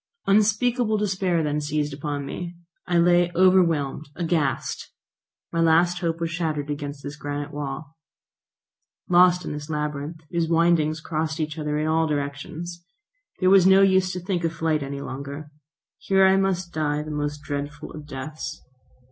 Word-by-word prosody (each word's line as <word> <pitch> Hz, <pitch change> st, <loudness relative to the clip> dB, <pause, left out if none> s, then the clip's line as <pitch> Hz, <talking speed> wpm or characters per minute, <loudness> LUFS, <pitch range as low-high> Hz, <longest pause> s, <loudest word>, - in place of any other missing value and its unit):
Unspeakable 215 Hz, +3 st, +3 dB
despair 190 Hz, -5 st, 0 dB
then 150 Hz, 0 st, -1 dB
seized 150 Hz, 0 st, -1 dB
upon 145 Hz, 0 st, -4 dB
me. 175 Hz, +5 st, -6 dB, 0.3 s
I 175 Hz, -1 st, +2 dB
lay 175 Hz, 0 st, +4 dB
overwhelmed, 165 Hz, -6 st, +3 dB
aghast! 160 Hz, -6 st, -1 dB, 0.6 s
My 165 Hz, -, 0 dB
last 170 Hz, +2 st, +4 dB
hope 165 Hz, -2 st, -1 dB
was 165 Hz, -1 st, -2 dB
shattered 155 Hz, -4 st, -2 dB
against 145 Hz, -1 st, -5 dB
this 145 Hz, +1 st, -6 dB
granite 145 Hz, 0 st, -5 dB
wall. 145 Hz, +1 st, -5 dB, 1.1 s
Lost 180 Hz, 0 st, +5 dB
in -, -, -4 dB
this 150 Hz, +1 st, -7 dB
labyrinth, 150 Hz, +1 st, -3 dB
whose 170 Hz, -2 st, 0 dB
windings 165 Hz, -2 st, +2 dB
crossed 155 Hz, 0 st, -2 dB
each 155 Hz, 0 st, -3 dB
other 150 Hz, -1 st, -1 dB
in 155 Hz, -, 0 dB
all 160 Hz, +1 st, +2 dB
directions, 150 Hz, +4 st, -4 dB, 0.6 s
it 185 Hz, -, +4 dB
was 190 Hz, -1 st, +7 dB
no 190 Hz, +1 st, +7 dB
use 190 Hz, -1 st, +3 dB
to 180 Hz, -, -3 dB
think 180 Hz, -1 st, -2 dB
of 165 Hz, 0 st, 0 dB
flight 160 Hz, -2 st, 0 dB
any 140 Hz, 0 st, -5 dB
longer. 140 Hz, +2 st, -7 dB, 0.5 s
Here 195 Hz, 0 st, +3 dB
I 190 Hz, 0 st, +5 dB
must 190 Hz, -2 st, 0 dB
die 150 Hz, -1 st, -1 dB
the 155 Hz, -, -7 dB
most 145 Hz, 0 st, -3 dB
dreadful 145 Hz, +1 st, -5 dB
of 150 Hz, -1 st, -9 dB
deaths. 150 Hz, +3 st, -6 dB
160 Hz, 155 wpm, -24 LUFS, 145-175 Hz, 1.1 s, was